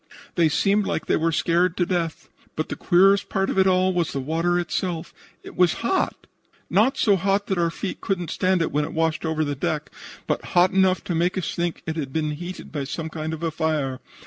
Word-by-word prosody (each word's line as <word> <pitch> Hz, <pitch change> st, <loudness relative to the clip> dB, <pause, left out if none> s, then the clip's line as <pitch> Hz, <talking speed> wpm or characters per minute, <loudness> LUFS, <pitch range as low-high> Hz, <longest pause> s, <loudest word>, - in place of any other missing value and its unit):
They 170 Hz, -3 st, +3 dB
seemed 200 Hz, +6 st, +2 dB
like -, -, -2 dB
they -, -, +2 dB
were 165 Hz, +1 st, +1 dB
scared 170 Hz, +2 st, +1 dB
to 175 Hz, -, +2 dB
death. 170 Hz, -3 st, -2 dB, 0.3 s
But 155 Hz, -, -3 dB
the -, -, -3 dB
queerest 195 Hz, +3 st, +4 dB
part 195 Hz, 0 st, 0 dB
of -, -, 0 dB
it 190 Hz, -, +5 dB
all 185 Hz, 0 st, +3 dB
was 175 Hz, -3 st, 0 dB
the 140 Hz, -, -2 dB
water 165 Hz, +6 st, 0 dB
itself. 175 Hz, -1 st, -2 dB, 0.3 s
It -, -, -11 dB
was 180 Hz, -2 st, +4 dB
hot 375 Hz, +9 st, 0 dB, 0.5 s
not 250 Hz, +7 st, +3 dB
so 205 Hz, -3 st, +4 dB
hot 195 Hz, +2 st, +1 dB
that 190 Hz, -2 st, -1 dB
our 170 Hz, -1 st, +2 dB
feet 185 Hz, +3 st, -5 dB
could 195 Hz, -2 st, -1 dB
not 175 Hz, -, -5 dB
stand 185 Hz, -2 st, +1 dB
it -, -, -2 dB
when 150 Hz, +1 st, +1 dB
it 155 Hz, -, -5 dB
washed 160 Hz, 0 st, 0 dB
over 155 Hz, -1 st, 0 dB
the 145 Hz, -, -2 dB
deck, 150 Hz, +2 st, -3 dB, 0.3 s
but -, -, -1 dB
hot 180 Hz, +1 st, +6 dB
enough 190 Hz, -1 st, +3 dB
to 175 Hz, -, -3 dB
make 175 Hz, +3 st, +1 dB
us 185 Hz, -, -2 dB
think 175 Hz, -1 st, -2 dB
that 160 Hz, 0 st, -3 dB
it -, -, -1 dB
had 135 Hz, -3 st, -5 dB
been 155 Hz, -1 st, 0 dB
heated 175 Hz, +5 st, -7 dB
by 145 Hz, -3 st, -3 dB
some 160 Hz, +3 st, -4 dB
kind 155 Hz, 0 st, -4 dB
of 160 Hz, +1 st, -6 dB
a 165 Hz, -, 0 dB
fire. 150 Hz, -5 st, -1 dB
170 Hz, 235 wpm, -24 LUFS, 160-185 Hz, 0.5 s, hot